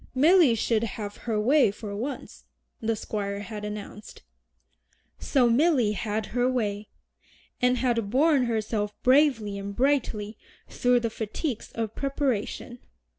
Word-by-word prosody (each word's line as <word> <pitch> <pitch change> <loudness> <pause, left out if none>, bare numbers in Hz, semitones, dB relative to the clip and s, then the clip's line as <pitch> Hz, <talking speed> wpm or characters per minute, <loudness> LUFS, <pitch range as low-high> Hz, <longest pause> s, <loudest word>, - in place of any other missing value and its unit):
"Milly 310 -2 +5
should 225 0 0
have 210 -1 -5
her 215 -2 +1
way 265 +4 +4
for 205 0 -7
once," 255 +6 -6 0.3
the 225 0 -1
Squire 200 -1 -4
had 210 0 -7
announced. 210 0 -8 1.0
So 260 -4 +2
Milly 250 -2 +3
had 210 +1 -2
her 245 +1 +2
way, 210 -4 -2 0.7
and 250 0 +3
had 235 -4 0
borne 275 +2 +3
herself 215 -2 -2
bravely 255 -7 +3
and 200 0 -6
brightly 230 -6 0 0.3
through 245 -1 +2
the 230 -1 -2
fatigues 225 +4 -4
of 225 -2 -3
preparation. 260 -3 -2
230 Hz, 125 wpm, -26 LUFS, 210-255 Hz, 1.0 s, Milly